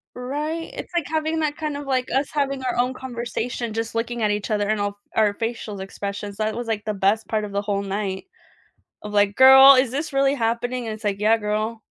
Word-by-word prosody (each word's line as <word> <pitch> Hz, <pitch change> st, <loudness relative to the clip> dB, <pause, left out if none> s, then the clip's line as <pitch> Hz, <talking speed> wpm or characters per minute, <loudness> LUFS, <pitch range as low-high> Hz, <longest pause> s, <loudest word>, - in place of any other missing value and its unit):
Right, 300 Hz, +6 st, -4 dB
it's, -, -, -8 dB
like, 335 Hz, -4 st, +1 dB
having 315 Hz, +1 st, -1 dB
that 295 Hz, -1 st, -1 dB
kind 305 Hz, -2 st, -3 dB
of 290 Hz, -, -7 dB
like, 260 Hz, -2 st, 0 dB
us 270 Hz, +2 st, 0 dB
having 275 Hz, -2 st, -1 dB
our 250 Hz, -, -1 dB
own 250 Hz, +1 st, +1 dB
conversation 240 Hz, -2 st, -4 dB
just 225 Hz, 0 st, -3 dB
looking 230 Hz, 0 st, -2 dB
at 210 Hz, -, +2 dB
each 205 Hz, +1 st, -2 dB
other 205 Hz, -1 st, 0 dB
and 215 Hz, -1 st, 0 dB
all 205 Hz, -, +1 dB
of -, -, -12 dB, 0.2 s
our 210 Hz, -2 st, +3 dB
facial 225 Hz, -3 st, -4 dB
expressions, 200 Hz, +1 st, -6 dB
that 215 Hz, 0 st, -1 dB
was, 240 Hz, -1 st, -5 dB
like, 215 Hz, -2 st, -2 dB
the 215 Hz, -, -1 dB
best 200 Hz, +3 st, +1 dB
part 215 Hz, -1 st, -1 dB
of 205 Hz, -, -6 dB
the 200 Hz, 0 st, -1 dB
whole 200 Hz, -1 st, -2 dB
night 195 Hz, -, -3 dB, 0.8 s
of 210 Hz, -, -7 dB
like, 205 Hz, -1 st, +2 dB
"Girl, 265 Hz, +1 st, +9 dB
is 255 Hz, -2 st, +2 dB
this 295 Hz, +2 st, -3 dB
really 275 Hz, 0 st, +3 dB
happening?" 240 Hz, 0 st, -1 dB
And 220 Hz, -, -3 dB
it's 215 Hz, 0 st, -10 dB
like, 200 Hz, -1 st, -1 dB
"Yeah, 220 Hz, +2 st, +4 dB
girl." 215 Hz, +1 st, -3 dB
230 Hz, 230 wpm, -23 LUFS, 210-265 Hz, 0.8 s, Girl